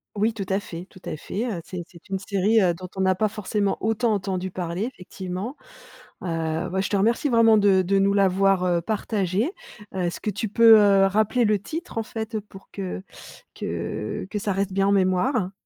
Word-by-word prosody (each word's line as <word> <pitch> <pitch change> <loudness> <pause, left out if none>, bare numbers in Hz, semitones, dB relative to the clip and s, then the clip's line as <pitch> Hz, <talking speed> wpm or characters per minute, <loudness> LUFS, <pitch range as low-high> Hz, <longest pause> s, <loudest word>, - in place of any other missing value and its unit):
Oui, 215 +3 +1
tout 200 -3 -4
à 190 +1 +2
fait, 180 -2 -8
tout 185 - -16
à - - -3
fait, 205 +9 -4
heu, 200 -8 -3
c'est 180 -2 -6
c'est 175 +2 -17
une 195 - -2
série, 200 +3 +2
heu, 180 -3 +3
dont 180 +1 -9
on 190 - 0
n'a 190 -1 +3
pas 215 +2 +1
forcément 205 -1 -1
autant 225 +1 +1
entendu 190 -2 -2
parler 175 +1 -3
effectivement. 190 0 -6 0.7
Heu, 165 -2 -2
bah 190 +1 0
je - - -2
te 205 - +1
remercie 230 +8 +2
vraiment 225 -2 +5
de 195 -2 +4
de 195 +2 +1
nous 200 +1 +3
l'avoir, 195 -1 +3
heu, 175 -1 +2
partagée, 210 - -1 0.4
heu, - - -2
est-ce 175 -1 -2
que 210 - -2
tu 205 +2 -3
peux, 225 +1 +8
heu, 200 -1 +5
rappeler 215 +4 +2
le 210 -1 +2
titre, 320 - -7
en - - -1
fait, 220 0 -4
pour 195 -1 -15
que 90 -1 -5 0.5
que 105 - -4
que 210 - -2
ça 205 0 -1
reste 195 0 -1
bien 195 0 +2
en - - +3
mémoire? 190 +2 +1
195 Hz, 205 wpm, -24 LUFS, 185-215 Hz, 0.7 s, peux